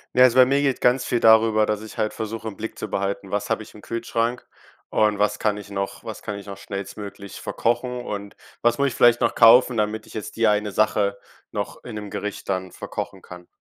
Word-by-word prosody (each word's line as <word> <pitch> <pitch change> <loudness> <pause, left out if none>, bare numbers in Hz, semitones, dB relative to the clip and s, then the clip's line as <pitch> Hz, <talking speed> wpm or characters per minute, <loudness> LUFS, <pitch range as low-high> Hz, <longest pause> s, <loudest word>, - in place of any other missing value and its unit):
Na - - +2
ja, - - +11
also 125 0 +3
bei 130 - +9
mir 140 +2 +2
geht 135 -3 +1
ganz 125 +1 +3
viel 120 - 0
darüber, 110 -1 +5
dass 105 0 -1
ich 110 - -10
halt 105 - 0
versuche, 110 +1 -5
im 100 - -5
Blick 110 +3 -6
zu 110 - -4
behalten: 100 0 -3
Was 105 +2 -2
habe 110 -1 0
ich - - -16
im 105 - -13
Kühlschrank? 115 +1 -2 0.4
Und 105 -1 +2
was 105 0 +1
kann 105 -1 +1
ich 100 -1 -10
noch 100 0 -4
was - - -7
kann 105 -1 -5
ich 100 - -10
noch 100 -1 -8
schnellstmöglich 100 0 -7
verkochen? 125 +1 -1
Und 100 -4 -6 0.3
was 120 0 +3
muss 140 0 +2
ich - - -7
vielleicht 120 0 +5
noch - - +2
kaufen, 125 +2 +7
damit 105 0 -1
ich - - -15
jetzt 110 - -6
die 115 -1 +3
eine 105 0 +1
Sache 100 0 +1 0.3
noch - - -5
in 120 - -8
'nem 105 -1 -6
Gericht 105 0 -5
dann 95 -1 -2
verkochen - - -6
kann? 90 -1 -11
110 Hz, 235 wpm, -23 LUFS, 100-115 Hz, 0.4 s, ja